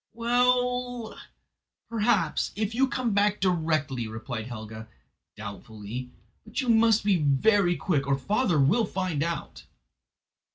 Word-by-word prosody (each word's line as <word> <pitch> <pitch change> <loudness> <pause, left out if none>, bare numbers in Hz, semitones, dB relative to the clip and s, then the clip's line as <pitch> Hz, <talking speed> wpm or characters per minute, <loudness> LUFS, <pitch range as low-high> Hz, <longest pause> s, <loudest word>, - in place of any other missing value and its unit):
"Well, 245 0 +1 0.7
perhaps, 215 -7 +1
if 215 +1 -2
you 265 +3 +2
come 245 -3 -1
back 205 0 +2
directly," 155 - 0
replied 110 +1 -6
Helga, 110 -2 -8 0.5
doubtfully; 110 +3 -7 0.3
"but 220 +2 -5
you 255 -3 -1
must 225 -1 +4
be 200 -2 +3
very 175 +6 +3
quick, 145 -7 -1
or 140 -1 +2
father 200 - +1
will 180 - +3
find 185 -6 -2
out!" 165 -1 -4
185 Hz, 120 wpm, -27 LUFS, 135-230 Hz, 0.7 s, must